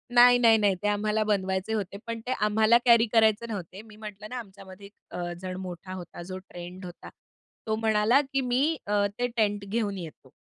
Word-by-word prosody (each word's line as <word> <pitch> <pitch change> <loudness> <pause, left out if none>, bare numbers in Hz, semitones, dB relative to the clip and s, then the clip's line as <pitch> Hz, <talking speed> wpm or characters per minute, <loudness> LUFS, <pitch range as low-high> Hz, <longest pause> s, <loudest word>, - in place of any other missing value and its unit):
नाही, 245 0 +8
नाही, 230 -2 +6
नाही. 205 -3 +2
ते - - +1
आम्हाला 210 +1 +1
बनवायचे 190 0 -1
होते, 200 -2 -3
पण 230 0 -4
ते - - -1
आम्हाला 220 +2 +4
कॅरी 235 -1 +6
करायचे 220 0 +4
नव्हते. 195 -2 -6
मी 220 -1 -16
म्हटलं 210 -1 -9
ना, 250 - -5
आमच्यामध्ये 195 -2 -12
एक 200 - -15 0.2
अ, 175 -1 -4
जण 185 -1 -5
मोठा 185 0 -7
होता, 175 -1 -8
जो 185 +1 -7
ट्रेंड 180 0 -10
होता. 175 0 -10 0.6
तो 220 - +1
म्हणाला, 220 +3 +3
की 275 -1 -2
"मी 265 +6 +1
अ, 205 -1 +2
ते 245 - +1
टेंट 205 -3 0
घेऊन 205 -2 -1
येतो." 155 -6 -10
210 Hz, 195 wpm, -27 LUFS, 190-225 Hz, 0.6 s, नाही